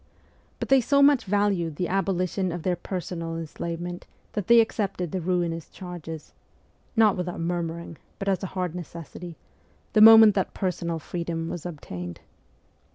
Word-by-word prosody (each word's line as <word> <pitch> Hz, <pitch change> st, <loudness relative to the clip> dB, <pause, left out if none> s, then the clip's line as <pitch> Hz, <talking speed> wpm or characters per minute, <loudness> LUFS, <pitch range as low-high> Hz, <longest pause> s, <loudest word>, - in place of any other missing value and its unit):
But -, -, -4 dB
they 270 Hz, -1 st, +6 dB
so 280 Hz, +4 st, +3 dB
much 285 Hz, -2 st, +5 dB
valued 195 Hz, -5 st, +1 dB
the 180 Hz, +3 st, -2 dB
abolition 185 Hz, 0 st, 0 dB
of 170 Hz, -1 st, -5 dB
their 180 Hz, -1 st, +1 dB
personal 175 Hz, -2 st, -5 dB
enslavement 170 Hz, +2 st, -5 dB, 0.3 s
that 205 Hz, -4 st, -3 dB
they 235 Hz, 0 st, +7 dB
accepted 200 Hz, -6 st, 0 dB
the 185 Hz, -, -2 dB
ruinous 170 Hz, -2 st, -1 dB
charges 165 Hz, -4 st, -8 dB, 0.6 s
not 220 Hz, -3 st, +5 dB
without 180 Hz, -1 st, -4 dB
murmuring, 170 Hz, -1 st, -3 dB, 0.2 s
but 195 Hz, -, -5 dB
as 195 Hz, -2 st, +1 dB
a 190 Hz, -, -3 dB
hard 180 Hz, -3 st, -1 dB
necessity 170 Hz, 0 st, -8 dB, 0.6 s
the 215 Hz, -, +5 dB
moment 220 Hz, -1 st, +10 dB
that 190 Hz, -1 st, -1 dB
personal 170 Hz, -3 st, -2 dB
freedom 165 Hz, 0 st, -4 dB
was 175 Hz, 0 st, -5 dB
obtained. 90 Hz, -, -7 dB
180 Hz, 150 wpm, -26 LUFS, 165-195 Hz, 0.6 s, moment